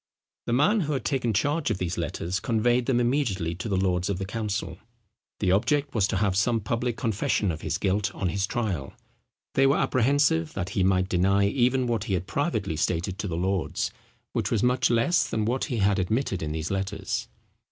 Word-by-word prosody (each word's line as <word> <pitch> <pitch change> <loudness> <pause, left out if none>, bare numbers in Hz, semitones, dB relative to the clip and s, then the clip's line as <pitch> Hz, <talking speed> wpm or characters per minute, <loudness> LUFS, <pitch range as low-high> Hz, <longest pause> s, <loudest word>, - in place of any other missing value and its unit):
The 120 - 0
man 150 - +4
who 150 -5 -1
had 130 -5 -3
taken 130 -4 0
the 100 - +1
charge 145 +5 0
of - - 0
these 90 -2 -2
letters 85 +2 -2
conveyed 120 +1 +1
them 125 -2 +2
immediately 120 - 0
to 85 +6 -5
the 95 - +1
lords 90 -1 +1
of 100 - -1
the 95 - -3
council. 100 -3 -3 0.6
The 90 - +2
object 140 +8 +1
was 105 -4 +2
to - - -1
have 100 -2 +1
some 115 +4 +2
public 115 +2 -2
confession 105 -3 0
of 80 - -6
his - - -1
guilt 100 +1 0
on 95 - -1
his 100 +1 -1
trial. 100 - -2 0.6
They 135 0 +4
were 140 - +3
apprehensive 130 - +2
that 95 -1 -3
he 100 -2 0
might 95 0 +2
deny 95 +2 +2
even 125 +4 +2
what 115 -3 -1
he 100 -5 0
had 90 0 -2
privately 105 - -1
stated 90 +5 -1
to 105 - -2
the 85 -3 -3
lords, 95 0 -1 0.4
which - - -1
was 110 -1 +1
much 125 +1 +3
less 120 +9 +3
than 110 -1 -1
what 125 +4 0
he 125 -6 -3
had 100 -1 +2
admitted 95 +1 -1
in 75 -1 -3
these 80 +3 -3
letters. 95 0 -2
105 Hz, 205 wpm, -26 LUFS, 95-120 Hz, 0.6 s, man